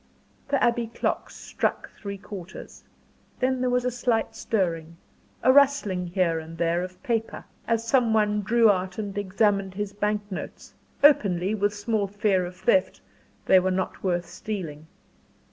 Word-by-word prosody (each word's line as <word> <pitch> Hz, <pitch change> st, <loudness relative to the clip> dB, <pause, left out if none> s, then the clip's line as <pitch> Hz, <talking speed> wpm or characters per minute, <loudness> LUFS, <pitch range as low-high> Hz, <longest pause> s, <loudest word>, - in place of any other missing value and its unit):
The 280 Hz, -1 st, +1 dB
Abbey 235 Hz, -1 st, +2 dB
clock 230 Hz, -, -2 dB
struck -, -, -3 dB
three 200 Hz, -1 st, -7 dB
quarters. 190 Hz, -2 st, -10 dB, 0.6 s
Then 255 Hz, 0 st, +1 dB
there 255 Hz, -, +1 dB
was 250 Hz, 0 st, +1 dB
a 250 Hz, -, +1 dB
slight 240 Hz, -2 st, 0 dB
stirring, 165 Hz, -6 st, -2 dB, 0.5 s
a 255 Hz, +2 st, +6 dB
rustling 260 Hz, -11 st, +3 dB
here 170 Hz, -2 st, +1 dB
and 160 Hz, +1 st, -10 dB
there 170 Hz, +1 st, +1 dB
of 185 Hz, +5 st, -8 dB
paper, 230 Hz, -4 st, -2 dB, 0.2 s
as 230 Hz, 0 st, 0 dB
some 240 Hz, -2 st, +3 dB
one 210 Hz, -1 st, +2 dB
drew 225 Hz, +1 st, +4 dB
out 185 Hz, -1 st, -3 dB
and 205 Hz, -3 st, -4 dB
examined 200 Hz, -1 st, 0 dB
his 205 Hz, 0 st, -3 dB
bank 210 Hz, 0 st, -1 dB
notes; 185 Hz, -, -7 dB, 0.3 s
openly, 200 Hz, -, +4 dB
with 205 Hz, 0 st, 0 dB
small 205 Hz, -1 st, -1 dB
fear 195 Hz, -2 st, +1 dB
of 180 Hz, -, -10 dB
theft 190 Hz, -2 st, +1 dB, 0.5 s
they 190 Hz, -, +6 dB
were 185 Hz, +1 st, 0 dB
not 185 Hz, 0 st, -2 dB
worth 175 Hz, -2 st, 0 dB
stealing. 175 Hz, -4 st, -6 dB
205 Hz, 155 wpm, -25 LUFS, 185-225 Hz, 0.6 s, a